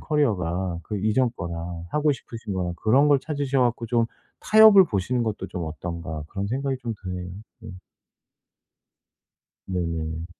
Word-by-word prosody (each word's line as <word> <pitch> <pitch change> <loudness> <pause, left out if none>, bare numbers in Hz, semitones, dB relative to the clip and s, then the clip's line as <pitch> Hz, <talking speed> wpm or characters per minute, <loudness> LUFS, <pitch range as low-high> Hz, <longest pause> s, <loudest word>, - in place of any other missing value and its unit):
커리어가 95 - 0
그 105 +5 -4
이전 110 +5 +2
거랑 85 -1 -5
하고 150 0 +2
싶으신 115 -4 -7
거랑 90 -2 -2
그런 135 +7 +4
걸 145 -1 +5
찾으셔 140 -1 -1
갖고 120 -1 0
좀 115 0 +2 0.4
'타협을 215 -3 +8
보시는 120 - -1
것도 105 -4 -3
좀 90 -2 -5
어떤가.' 80 -1 -5
그런 100 0 -4
생각이 135 +4 -1
좀 115 - -2
드네요. 90 -1 -5 0.3
네. - - -9 2.0
네네. 85 -3 -3
105 Hz, 285 characters per minute, -24 LUFS, 85-130 Hz, 2.0 s, 타협을